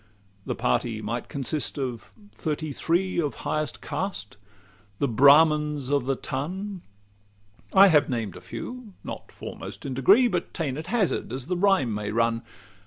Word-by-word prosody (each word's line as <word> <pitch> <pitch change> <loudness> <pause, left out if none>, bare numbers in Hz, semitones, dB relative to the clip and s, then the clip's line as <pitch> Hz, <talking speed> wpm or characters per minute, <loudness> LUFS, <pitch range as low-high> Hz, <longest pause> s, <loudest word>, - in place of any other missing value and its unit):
The - - -1
party 110 - 0
might 115 +3 -4
consist 140 +3 -2
of 125 -4 -4 0.2
thirty 155 -1 -3
three 175 +4 +1
Of 145 -7 -2
highest 155 0 -2
caste 180 - -4 0.6
the 140 - +1
Brahmins 150 +2 +5
of 140 -3 +1
the 135 - +2
ton. 185 +10 -4 0.9
I 195 0 +8
have 150 -4 +4
named 115 -7 -2
a - - -10
few, 245 -5 -8
not - - -7
foremost - - -8
in 135 - -3
degree, 200 - +5
But 180 -6 -3
ta'en 145 -6 -2
at 155 +2 -6
hazard 215 - 0
as 130 0 -3
the 180 - -1
rhyme 180 - +3
may 105 0 -3
run. 115 +1 +1
145 Hz, 155 wpm, -26 LUFS, 125-180 Hz, 0.9 s, I